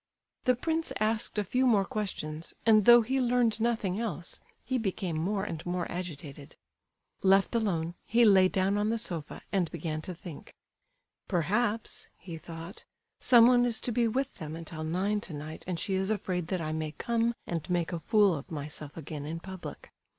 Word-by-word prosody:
The 250 Hz, -1 st, +4 dB
prince 320 Hz, +5 st, -1 dB
asked 220 Hz, +1 st, 0 dB
a 210 Hz, -, +2 dB
few 255 Hz, +6 st, +1 dB
more 205 Hz, -5 st, +4 dB
questions, 165 Hz, -7 st, -4 dB
and 215 Hz, -3 st, +6 dB
though 240 Hz, -1 st, +9 dB
he 265 Hz, +4 st, 0 dB
learned 240 Hz, -3 st, +2 dB
nothing 220 Hz, -5 st, 0 dB
else, 180 Hz, -7 st, -3 dB, 0.3 s
he 260 Hz, -1 st, 0 dB
became 190 Hz, -5 st, -2 dB
more 190 Hz, +5 st, 0 dB
and 165 Hz, -6 st, -4 dB
more 175 Hz, -1 st, -2 dB
agitated. 150 Hz, -5 st, -7 dB, 0.7 s
Left 195 Hz, +2 st, +4 dB
alone, 175 Hz, -8 st, 0 dB
he 235 Hz, +1 st, +5 dB
lay 190 Hz, -3 st, +7 dB
down 195 Hz, +2 st, +1 dB
on 210 Hz, +1 st, +1 dB
the 230 Hz, -, +1 dB
sofa, 170 Hz, -9 st, -5 dB
and 185 Hz, -5 st, +1 dB
began 155 Hz, -1 st, -4 dB
to 180 Hz, +3 st, -6 dB
think. 170 Hz, -3 st, -10 dB, 0.7 s
"Perhaps," 210 Hz, +5 st, 0 dB
he 165 Hz, -3 st, -8 dB
thought, 165 Hz, +3 st, -9 dB, 0.4 s
"someone 245 Hz, 0 st, +7 dB
is 235 Hz, -2 st, +2 dB
to 245 Hz, -, -1 dB
be 235 Hz, 0 st, +2 dB
with 265 Hz, +4 st, -1 dB
them 155 Hz, 0 st, -6 dB
until 165 Hz, -1 st, -6 dB
nine 190 Hz, +6 st, 0 dB
tonight 155 Hz, -2 st, -7 dB
and 180 Hz, -2 st, -2 dB
she 195 Hz, -, -2 dB
is 190 Hz, +1 st, 0 dB
afraid 185 Hz, -5 st, -1 dB
that 185 Hz, -1 st, -1 dB
I 155 Hz, -1 st, -2 dB
may 155 Hz, -1 st, -3 dB
come 235 Hz, +3 st, 0 dB
and 170 Hz, 0 st, -4 dB
make 175 Hz, -1 st, 0 dB
a 170 Hz, -, -2 dB
fool 205 Hz, +2 st, +4 dB
of 145 Hz, -3 st, -6 dB
myself 150 Hz, -1 st, -6 dB
again, 150 Hz, -2 st, -6 dB
in 165 Hz, +2 st, -4 dB
public." 190 Hz, +1 st, -9 dB
190 Hz, 180 wpm, -30 LUFS, 165-225 Hz, 0.7 s, though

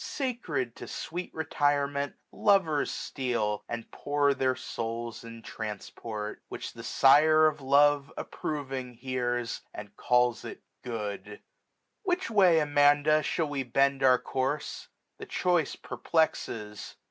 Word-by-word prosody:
Sacred 205 Hz, -, -3 dB
to -, -, -8 dB
sweet 175 Hz, +3 st, -5 dB
retirement, 145 Hz, -2 st, 0 dB, 0.2 s
lovers 190 Hz, -8 st, +2 dB
steal. 115 Hz, -6 st, -2 dB
And 120 Hz, -1 st, -5 dB
pour 145 Hz, 0 st, +1 dB
their 130 Hz, -1 st, +1 dB
souls 115 Hz, -2 st, -5 dB
in 115 Hz, 0 st, -10 dB
transport; 105 Hz, 0 st, -6 dB
which -, -, -6 dB
the -, -, -9 dB
Sire 155 Hz, +3 st, +5 dB
Of 155 Hz, -1 st, +1 dB
love 140 Hz, +1 st, +4 dB
approving 135 Hz, -4 st, -4 dB
hears, 120 Hz, -1 st, -2 dB
and 105 Hz, 0 st, -9 dB
calls 125 Hz, -1 st, +2 dB
it -, -, -8 dB, 0.2 s
good, 105 Hz, -4 st, -4 dB
1399 435 Hz, -, -11 dB, 0.6 s
Which 365 Hz, -, -1 dB
way, 185 Hz, -6 st, +5 dB
Amanda, 145 Hz, +1 st, +4 dB
shall 160 Hz, +1 st, -1 dB
we 145 Hz, -2 st, -2 dB
bend 135 Hz, +2 st, +1 dB
our 130 Hz, -1 st, +6 dB
course? 135 Hz, +4 st, -3 dB, 0.3 s
The -, -, -8 dB
choice 175 Hz, -5 st, +1 dB
perplexes. 110 Hz, -10 st, -2 dB
140 Hz, 125 wpm, -29 LUFS, 120-155 Hz, 0.6 s, our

